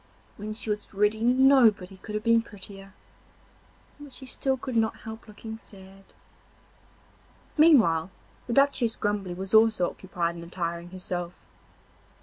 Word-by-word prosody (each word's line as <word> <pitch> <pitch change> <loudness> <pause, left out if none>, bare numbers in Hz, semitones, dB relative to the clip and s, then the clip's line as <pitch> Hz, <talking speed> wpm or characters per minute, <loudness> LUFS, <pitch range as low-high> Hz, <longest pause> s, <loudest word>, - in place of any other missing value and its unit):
When 215 +1 -6
she 220 -1 -4
was 210 -1 -5
ready 210 +2 +2
nobody 240 -6 +4
could 210 +2 -8
have 210 - -2
been 230 0 +4
prettier, 195 -2 -11 1.1
but 290 -1 -11
she 265 - -10
still 265 +1 -1
could 255 -1 -6
not 220 -1 0
help 220 +1 -9
looking 220 +1 -9
sad. 195 -2 -13 1.5
Meanwhile 220 - +5 0.4
the 240 - -2
Duchess 275 -4 +2
Grumbly 205 -3 -2
was 190 +2 -6
also 220 -5 +5
occupied 175 -3 -3
in 170 - -8
attiring 170 0 -4
herself. 180 -1 -5
210 Hz, 135 wpm, -27 LUFS, 185-230 Hz, 1.5 s, Meanwhile